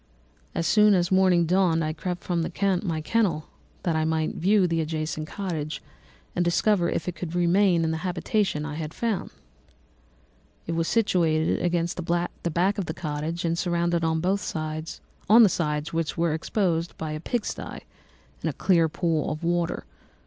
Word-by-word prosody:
As 165 Hz, -, 0 dB
soon 210 Hz, +3 st, +5 dB
as 175 Hz, 0 st, +1 dB
morning 185 Hz, -2 st, +4 dB
dawned 175 Hz, -2 st, +2 dB
I 155 Hz, 0 st, -1 dB
crept 175 Hz, +2 st, -4 dB
from 170 Hz, -2 st, 0 dB, 0.4 s
my 165 Hz, -5 st, -2 dB
kennel, 170 Hz, -5 st, 0 dB, 0.3 s
that 170 Hz, -4 st, 0 dB
I 160 Hz, -, +1 dB
might 160 Hz, 0 st, 0 dB
view 195 Hz, +2 st, +3 dB
the 165 Hz, -2 st, 0 dB
adjacent 155 Hz, 0 st, -3 dB
cottage 160 Hz, -6 st, -4 dB, 0.6 s
and 175 Hz, -, +2 dB
discover 175 Hz, +1 st, +2 dB
if 160 Hz, -, -2 dB
I -, -, 0 dB
could 170 Hz, 0 st, -6 dB
remain 175 Hz, 0 st, +3 dB
in 160 Hz, -, +1 dB
the 160 Hz, -, -1 dB
habitation 180 Hz, -1 st, -1 dB
I 150 Hz, -, -5 dB
had 155 Hz, 0 st, -5 dB
found. 225 Hz, -5 st, -1 dB, 1.4 s
It -, -, -4 dB
was 165 Hz, 0 st, 0 dB
situated 170 Hz, -8 st, +2 dB
against 170 Hz, -1 st, 0 dB
the 175 Hz, 0 st, -2 dB
back 190 Hz, +5 st, +2 dB
of 195 Hz, -, -1 dB
the 160 Hz, -, -4 dB
cottage 155 Hz, +1 st, -3 dB
and 165 Hz, 0 st, +1 dB
surrounded 170 Hz, -1 st, 0 dB
on 160 Hz, 0 st, +1 dB
the 190 Hz, +3 st, +2 dB
sides 155 Hz, 0 st, +1 dB
which 165 Hz, -1 st, -1 dB
were 165 Hz, -2 st, +1 dB
exposed 170 Hz, 0 st, -1 dB
by 155 Hz, -1 st, -4 dB
a 155 Hz, -, -4 dB
pig 215 Hz, +7 st, -2 dB
sty -, -, -6 dB, 0.6 s
and -, -, -1 dB
a -, -, -3 dB
clear 170 Hz, -4 st, +3 dB
pool 160 Hz, -2 st, 0 dB
of 155 Hz, +2 st, -5 dB
water. 170 Hz, 0 st, 0 dB
170 Hz, 165 wpm, -26 LUFS, 160-180 Hz, 1.4 s, soon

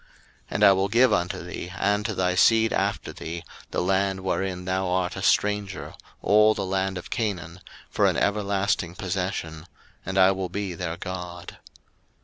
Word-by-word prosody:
01:017:008 -, -, -30 dB, 0.4 s
And -, -, 0 dB
I -, -, +9 dB
will 95 Hz, 0 st, +2 dB
give 120 Hz, +5 st, +4 dB
unto 90 Hz, +1 st, -1 dB
thee, 90 Hz, +1 st, -7 dB
and 105 Hz, +1 st, +1 dB
to -, -, -3 dB
thy 90 Hz, -1 st, +1 dB
seed 110 Hz, +4 st, +4 dB
after -, -, -1 dB
thee, 85 Hz, +1 st, -6 dB, 0.3 s
the -, -, -1 dB
land 95 Hz, +1 st, +1 dB
wherein 95 Hz, -1 st, -2 dB
thou 95 Hz, 0 st, -1 dB
art 90 Hz, 0 st, 0 dB
a 95 Hz, -, -5 dB
stranger, 100 Hz, 0 st, 0 dB, 0.3 s
all 105 Hz, +1 st, +5 dB
the 100 Hz, -, -2 dB
land 95 Hz, 0 st, -1 dB
of 90 Hz, -, -9 dB
Canaan, 90 Hz, -6 st, -3 dB, 0.3 s
for -, -, +2 dB
an -, -, +1 dB
everlasting 100 Hz, -4 st, 0 dB
possession; 90 Hz, -3 st, -4 dB, 0.4 s
and 95 Hz, +1 st, -4 dB
I 95 Hz, 0 st, +6 dB
will 95 Hz, -1 st, -3 dB
be 100 Hz, -2 st, -3 dB
their 85 Hz, -1 st, -4 dB
God. 90 Hz, -1 st, -7 dB
95 Hz, 170 wpm, -25 LUFS, 90-100 Hz, 0.4 s, I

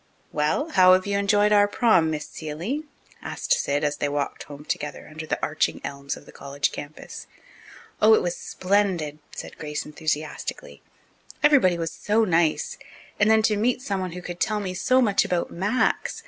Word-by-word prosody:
"Well, 155 Hz, -, 0 dB
how 185 Hz, -7 st, +7 dB
have 185 Hz, 0 st, +3 dB
you 200 Hz, 0 st, 0 dB
enjoyed 205 Hz, +1 st, +3 dB
our 205 Hz, -1 st, +5 dB
prom, 205 Hz, -7 st, +3 dB
Miss 155 Hz, -1 st, -3 dB
Seeley?" 175 Hz, -, -5 dB, 0.4 s
asked -, -, -1 dB
Sid, 145 Hz, +1 st, 0 dB
as 150 Hz, -1 st, 0 dB
they 145 Hz, -, -1 dB
walked 145 Hz, 0 st, -3 dB
home 145 Hz, 0 st, -11 dB
together 150 Hz, -, -4 dB
under 155 Hz, +1 st, -8 dB
the -, -, 0 dB
arching 155 Hz, +1 st, 0 dB
elms 140 Hz, 0 st, -5 dB
of -, -, -15 dB
the -, -, -14 dB
college 140 Hz, 0 st, -2 dB
campus. 145 Hz, +1 st, -9 dB, 0.7 s
"Oh! 440 Hz, -, +7 dB
it 440 Hz, -, +2 dB
was -, -, -1 dB
splendid," 195 Hz, -, -1 dB, 0.2 s
said -, -, -8 dB
Grace 150 Hz, -1 st, -4 dB
enthusiastically. 155 Hz, 0 st, -4 dB, 0.6 s
"Everybody 265 Hz, -13 st, +5 dB
was 165 Hz, -1 st, -3 dB
so 215 Hz, +2 st, +1 dB
nice. 165 Hz, -4 st, +1 dB, 0.4 s
And 210 Hz, +1 st, +4 dB
then 220 Hz, 0 st, +5 dB
to 215 Hz, -1 st, +3 dB
meet 245 Hz, +4 st, 0 dB
someone 190 Hz, -5 st, -3 dB
who 180 Hz, 0 st, -8 dB
could 175 Hz, 0 st, -7 dB
tell 215 Hz, -1 st, 0 dB
me 190 Hz, -3 st, -4 dB
so 255 Hz, +8 st, +3 dB
much 205 Hz, -4 st, +3 dB
about 175 Hz, -1 st, -1 dB
Max! 205 Hz, +8 st, 0 dB
185 Hz, 175 wpm, -24 LUFS, 155-210 Hz, 0.7 s, how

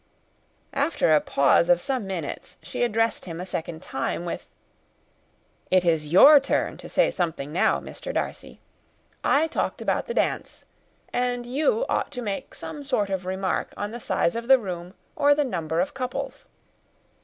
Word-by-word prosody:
After 280 Hz, -, +2 dB
a 150 Hz, -, +5 dB
pause 140 Hz, +5 st, +3 dB
of 175 Hz, -1 st, +5 dB
some 255 Hz, -2 st, -2 dB
minutes, 175 Hz, -6 st, -5 dB
she 175 Hz, -, -5 dB
addressed 225 Hz, -1 st, +1 dB
him 165 Hz, -2 st, -6 dB
a 180 Hz, -, -4 dB
second 165 Hz, -3 st, -5 dB
time, 135 Hz, +5 st, -3 dB
with 170 Hz, -, -5 dB, 1.2 s
"It 185 Hz, -1 st, +3 dB
is 155 Hz, -3 st, +1 dB
your 285 Hz, -, +9 dB
turn 275 Hz, -, -1 dB
to -, -, -10 dB
say -, -, +3 dB
something 160 Hz, -5 st, -2 dB
now, 175 Hz, +5 st, +2 dB
Mr. -, -, -7 dB
Darcy. -, -, -4 dB, 0.6 s
I 295 Hz, +3 st, +4 dB
talked 325 Hz, -, -2 dB
about -, -, -1 dB
the 475 Hz, -, -4 dB
dance, -, -, -1 dB, 0.5 s
and 245 Hz, -1 st, -1 dB
you 315 Hz, -, +1 dB
ought -, -, 0 dB
to 250 Hz, -2 st, -4 dB
make 210 Hz, +5 st, -4 dB
some 290 Hz, -, -7 dB
kind 210 Hz, -8 st, 0 dB
of 185 Hz, -1 st, -2 dB
remark 190 Hz, 0 st, -2 dB
on 205 Hz, +1 st, -3 dB
the 240 Hz, -, -6 dB
size 170 Hz, -5 st, 0 dB
of 235 Hz, 0 st, -4 dB
the 265 Hz, 0 st, +8 dB
room, 180 Hz, -4 st, -6 dB, 0.2 s
or 290 Hz, 0 st, +4 dB
the 295 Hz, 0 st, +1 dB
number 165 Hz, -8 st, -2 dB
of 290 Hz, +8 st, 0 dB
couples." 255 Hz, -2 st, -5 dB
200 Hz, 165 wpm, -25 LUFS, 175-265 Hz, 1.2 s, your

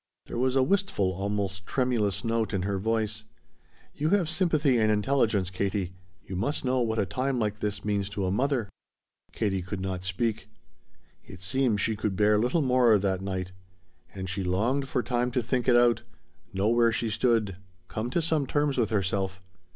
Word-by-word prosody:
There -, -, -5 dB
was 130 Hz, +1 st, +1 dB
a 135 Hz, -, +4 dB
wistful, 190 Hz, -, +1 dB
almost 95 Hz, 0 st, -3 dB
tremulous 120 Hz, -7 st, 0 dB
note 115 Hz, -2 st, 0 dB
in 90 Hz, -, -1 dB
her 100 Hz, 0 st, -1 dB
voice. 110 Hz, 0 st, -1 dB, 0.7 s
"You 155 Hz, +2 st, -1 dB
have 180 Hz, -5 st, +2 dB
sympathy 155 Hz, -7 st, +2 dB
and 110 Hz, -1 st, +3 dB
intelligence, 105 Hz, -4 st, +1 dB
Katie. 95 Hz, 0 st, -2 dB, 0.3 s
You 95 Hz, -, -6 dB
must 120 Hz, -, -1 dB
know 130 Hz, 0 st, +2 dB
what 110 Hz, -1 st, 0 dB
a 100 Hz, -, +2 dB
time 130 Hz, +8 st, -1 dB
like 105 Hz, -2 st, -1 dB
this 105 Hz, -1 st, -3 dB
means 100 Hz, -1 st, 0 dB
to 100 Hz, -1 st, -3 dB
a 90 Hz, -, 0 dB
mother." 125 Hz, +1 st, 0 dB, 0.6 s
Katie 95 Hz, -4 st, -1 dB
could 95 Hz, +2 st, -5 dB
not 95 Hz, -1 st, -3 dB
speak. 105 Hz, +5 st, -2 dB, 0.7 s
It 90 Hz, -, -12 dB
seemed 115 Hz, +2 st, +1 dB
she 110 Hz, -, +1 dB
could 105 Hz, -2 st, -2 dB
bear 105 Hz, +1 st, +4 dB
little 125 Hz, +8 st, +1 dB
more 125 Hz, -4 st, +5 dB
that 95 Hz, -1 st, -1 dB
night. 95 Hz, -2 st, -3 dB, 0.6 s
And 95 Hz, -1 st, -5 dB
she 95 Hz, +1 st, -3 dB
longed 115 Hz, +10 st, 0 dB
for 125 Hz, -2 st, -1 dB
time 125 Hz, 0 st, 0 dB
to 125 Hz, -2 st, +1 dB
think 125 Hz, +2 st, -1 dB
it 125 Hz, -, +5 dB
out, 120 Hz, -1 st, +4 dB, 0.5 s
know 100 Hz, +2 st, +1 dB
where 115 Hz, 0 st, +4 dB
she 115 Hz, 0 st, -1 dB
stood, 110 Hz, -4 st, +1 dB, 0.3 s
come 110 Hz, +3 st, -3 dB
to 165 Hz, +6 st, 0 dB
some 155 Hz, -4 st, +1 dB
terms 145 Hz, -2 st, +1 dB
with 110 Hz, -3 st, +2 dB
herself. 95 Hz, -2 st, -1 dB
110 Hz, 180 wpm, -27 LUFS, 95-125 Hz, 0.7 s, more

